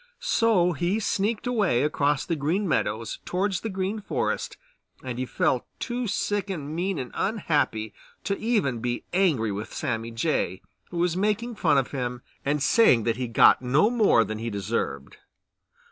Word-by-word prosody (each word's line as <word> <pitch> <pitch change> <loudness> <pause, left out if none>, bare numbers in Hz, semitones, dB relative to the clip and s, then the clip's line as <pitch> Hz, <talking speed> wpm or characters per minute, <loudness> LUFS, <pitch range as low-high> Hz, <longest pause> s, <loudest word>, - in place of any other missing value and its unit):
So 200 -6 +3
he 175 +6 0
sneaked 210 +2 -1
away 205 - +2
across 145 -1 +1
the 165 - -1
Green 165 +8 0
Meadows 110 -7 -1
towards 190 +1 -1
the 225 - -3
Green 195 +2 -2
Forest - - -2 0.5
and 125 -2 -5
he 130 - -2
felt 125 - 0
too 245 0 -3
sick 205 0 -1
and 155 -5 -4
mean 185 +2 -1
and 125 -3 -5
unhappy 145 - 0 0.3
to 200 - -1
even 205 - 0
be 120 +1 -2
angry 155 - +2
with 105 +2 -5
Sammy 115 -5 -2
Jay, 115 - -1 0.3
who 175 - -6
was 175 0 +1
making 215 +5 0
fun 165 -8 +2
of 135 - 0
him 125 -2 -4 0.2
and 145 0 0
saying 145 - +5
that 115 0 0
he 130 - -2
had 115 - -9
got - - +6
no 140 - +3
more 215 - +4
than 110 0 -5
he 115 +1 -3
deserved. 95 -8 -3
155 Hz, 170 wpm, -26 LUFS, 120-200 Hz, 0.5 s, got